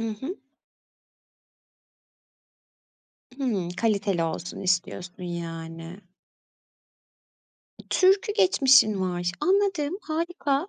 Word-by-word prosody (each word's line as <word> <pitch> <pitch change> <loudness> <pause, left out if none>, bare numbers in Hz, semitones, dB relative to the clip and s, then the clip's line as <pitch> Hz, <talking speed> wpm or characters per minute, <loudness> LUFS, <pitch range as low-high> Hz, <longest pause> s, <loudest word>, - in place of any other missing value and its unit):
I 225 - -2
hı. 335 +9 -5 3.0
Hımm, 225 -11 -1
kaliteli 200 -2 0
olsun 165 +1 -4
istiyorsun, 180 +1 -2
yani. 165 0 -6 1.9
Türkü 385 +3 +3
geçmişin 270 - +5
var, 175 -1 -1
anladım, 375 -4 +1
harika. 320 -1 -2
215 Hz, 65 wpm, -26 LUFS, -, 3.0 s, geçmişin